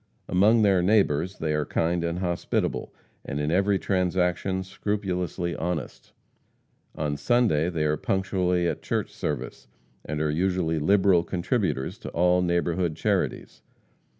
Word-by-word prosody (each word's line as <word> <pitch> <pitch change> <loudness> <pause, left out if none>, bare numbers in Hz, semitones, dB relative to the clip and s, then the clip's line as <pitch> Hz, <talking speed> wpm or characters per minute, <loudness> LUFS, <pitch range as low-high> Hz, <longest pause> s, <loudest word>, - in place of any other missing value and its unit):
Among 110 +5 +4
their 95 -3 +4
neighbors 95 -3 +2
they 80 -1 -1
are 75 0 +1
kind 85 +3 0
and 85 0 -2
hospitable, 85 -7 -2 0.3
and 70 - -4
in 75 +1 -1
every 100 +3 +2
transaction 95 0 0
scrupulously 95 -3 -3
honest. 85 -5 -4 0.8
On 75 -1 -2
Sunday 100 - +2
they 80 -3 -1
are 75 0 +1
punctually 90 -1 0
at - - -3
church - - -2
service, 60 0 -5 0.4
and 75 +1 -4
are 75 -1 0
usually 85 -1 0
liberal 95 +1 +4
contributors 90 - -2
to - - -7
all 90 +1 +3
neighborhood 85 -1 0
charities. - - -2
90 Hz, 130 wpm, -26 LUFS, 80-95 Hz, 0.8 s, Among